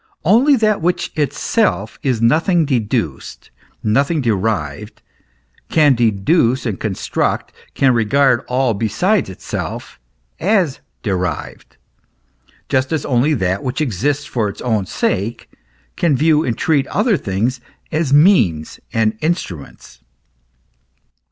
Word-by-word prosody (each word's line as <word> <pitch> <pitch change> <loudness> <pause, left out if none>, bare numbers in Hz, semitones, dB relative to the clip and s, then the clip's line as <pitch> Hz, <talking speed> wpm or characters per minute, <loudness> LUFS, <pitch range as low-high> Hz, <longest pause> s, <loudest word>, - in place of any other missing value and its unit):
Only 245 - +5
that 215 -5 +1
which 175 +2 -1
itself 160 +8 -1
is 125 -5 -1
nothing 165 - +3
deduced, 115 - -3 0.3
nothing 140 +9 +1
derived, 105 - -2 0.7
can 150 -3 +4
deduce 120 - +1
and 105 -6 -3
cooi 110 - -2
s - - -7
tract, - - -1 0.2
can 135 -2 +3
regard 120 +2 +2
all 125 -1 +1
besides 140 - 0
itself 95 - -6 0.4
as 185 -7 +1 0.2
derived; 90 -4 -4 0.9
just 130 0 0
as 160 -3 -1
only 135 +4 +2
that 95 -3 -1
which 130 +2 -3
exists 145 - -1
for 110 -4 -1
its - - -9
own 110 -6 -1
sake 110 +7 -2 0.4
can 155 -6 +1
view 155 +1 +3
and 120 -7 -2
treat 145 -5 +1
other 210 +2 +1
things 120 - -2 0.3
as 155 -3 -1
means 140 - +3
and 110 -1 0
instruments. 150 - -4
130 Hz, 120 wpm, -18 LUFS, 110-155 Hz, 0.9 s, Only